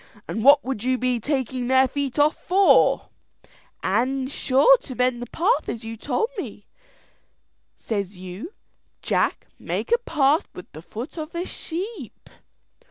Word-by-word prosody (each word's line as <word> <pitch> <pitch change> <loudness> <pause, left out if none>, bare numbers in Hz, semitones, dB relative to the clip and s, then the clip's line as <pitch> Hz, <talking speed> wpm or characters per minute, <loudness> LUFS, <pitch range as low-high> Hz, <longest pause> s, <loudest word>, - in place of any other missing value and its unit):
and 220 - -3
what 285 +2 +6
would 255 -5 -3
you 255 0 +1
be 250 -1 0
taking 260 -1 -2
their 260 +1 +4
feet 275 -2 -3
off 295 +1 +4
for?" 385 +2 +3 0.7
"An' 255 +7 0
sure 275 - +4
to 265 - -9
mend 250 -1 +1
the 245 - -5
path 375 - 0
as 230 -1 -5
you 225 0 -5
told 290 - -1
me. - - -7 1.1
Says 200 -3 -4
you, 185 - -8 0.5
'Jack, - - 0
make - - -4
a 475 - +4
path 305 - +2
with 180 - -11
the 155 - -10
foot 235 - -8
of 310 +1 -6
the 345 +1 -3
sheep.'" 350 - -7
260 Hz, 150 wpm, -23 LUFS, 235-310 Hz, 1.1 s, what